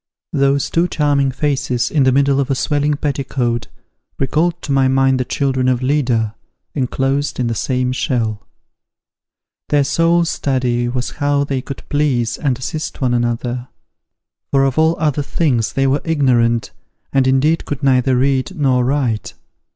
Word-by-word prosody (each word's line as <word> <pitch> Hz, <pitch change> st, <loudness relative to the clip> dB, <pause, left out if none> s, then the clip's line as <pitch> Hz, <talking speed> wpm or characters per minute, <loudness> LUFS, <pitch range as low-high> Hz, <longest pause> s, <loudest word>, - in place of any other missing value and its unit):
Those 140 Hz, -1 st, +1 dB
two 170 Hz, +2 st, +2 dB
charming 145 Hz, -4 st, +1 dB
faces 130 Hz, -3 st, -1 dB
in 150 Hz, -, +2 dB
the 130 Hz, -, +4 dB
middle 140 Hz, +1 st, +2 dB
of 140 Hz, -, -1 dB
a 135 Hz, -, +1 dB
swelling 145 Hz, +2 st, 0 dB
petticoat, 135 Hz, -5 st, -2 dB, 0.5 s
recalled 155 Hz, +5 st, 0 dB
to 140 Hz, -, -4 dB
my 135 Hz, -1 st, +3 dB
mind 135 Hz, 0 st, +2 dB
the 125 Hz, -, -1 dB
children 130 Hz, 0 st, 0 dB
of 125 Hz, 0 st, 0 dB
Leda, 125 Hz, -6 st, +1 dB, 0.4 s
enclosed 135 Hz, +1 st, -1 dB
in 125 Hz, -, +1 dB
the 115 Hz, -, -1 dB
same 125 Hz, +2 st, -1 dB
shell. 115 Hz, -5 st, -2 dB, 1.2 s
Their 145 Hz, -1 st, +3 dB
sole 165 Hz, +4 st, +2 dB
study 125 Hz, -6 st, -1 dB
was 125 Hz, 0 st, -3 dB
how 145 Hz, 0 st, +2 dB
they 135 Hz, -2 st, -2 dB
could 135 Hz, -, -9 dB
please 140 Hz, -6 st, 0 dB
and 135 Hz, -5 st, 0 dB
assist 155 Hz, +4 st, -5 dB
one 125 Hz, -2 st, +1 dB
another; 120 Hz, +1 st, -1 dB, 0.8 s
for 135 Hz, -1 st, +3 dB
of 135 Hz, +2 st, +1 dB
all 160 Hz, +1 st, +3 dB
other 150 Hz, -2 st, +1 dB
things 130 Hz, -7 st, 0 dB
they 135 Hz, -, +1 dB
were 135 Hz, +2 st, +1 dB
ignorant, 120 Hz, -7 st, +1 dB, 0.4 s
and 135 Hz, -1 st, +3 dB
indeed 140 Hz, +5 st, +2 dB
could 145 Hz, -2 st, -5 dB
neither 130 Hz, -1 st, +3 dB
read 135 Hz, +6 st, 0 dB
nor 130 Hz, -3 st, +2 dB
write. 125 Hz, -4 st, -1 dB
135 Hz, 155 wpm, -18 LUFS, 125-145 Hz, 1.2 s, the